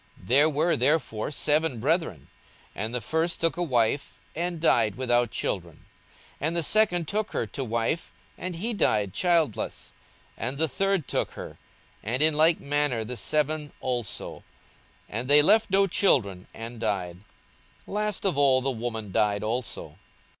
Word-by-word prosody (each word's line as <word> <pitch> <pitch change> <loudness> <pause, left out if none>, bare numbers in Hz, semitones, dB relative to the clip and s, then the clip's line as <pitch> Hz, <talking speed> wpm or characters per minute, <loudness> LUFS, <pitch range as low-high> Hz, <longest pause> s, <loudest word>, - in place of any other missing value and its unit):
42:020:029 90 - -16
There 145 +5 +5
were 155 +3 +1
therefore 125 -5 0
seven 150 -2 +1
brethren: 140 - -1 0.5
and 110 +3 -4
the 125 -1 -2
first 160 +8 0
took 165 0 +1
a 175 - -3
wife, 130 -3 0 0.2
and 170 +1 -3
died 115 -10 +3
without 120 -2 +1
children. 85 -7 -3
42:020:030 - - -24 0.6
And 165 - -2
the 170 - +2
second 180 -3 +2
took 215 +3 -2
her - - 0
to 135 - -5
wife, 115 +7 -2 0.2
and 180 -1 -5
he 225 +8 -3
died 105 - +1
childless. 165 - 0 0.5
42:020:031 - - -1
And 135 - -6
the 160 +2 +2
third 195 0 0
took - - -1
her; - - -9 0.4
and 125 +7 -1
in 155 0 +4
like 160 +2 +4
manner 145 -5 0
the 125 - -5
seven 150 +6 -1
also: 120 -5 -4 0.6
and 115 +4 -4
they 145 +1 +6
left 215 +6 +4
no 195 +1 +4
children, 105 - +1
and 115 +1 -8
died. 95 -6 -2 0.7
42:020:032 - - -9
Last 210 -1 -1
of 180 -7 +1
all 135 -2 +4
the 135 +1 0
woman 110 -4 -5
died 105 +1 +1
also. 115 +3 -4
140 Hz, 165 wpm, -26 LUFS, 115-165 Hz, 0.7 s, they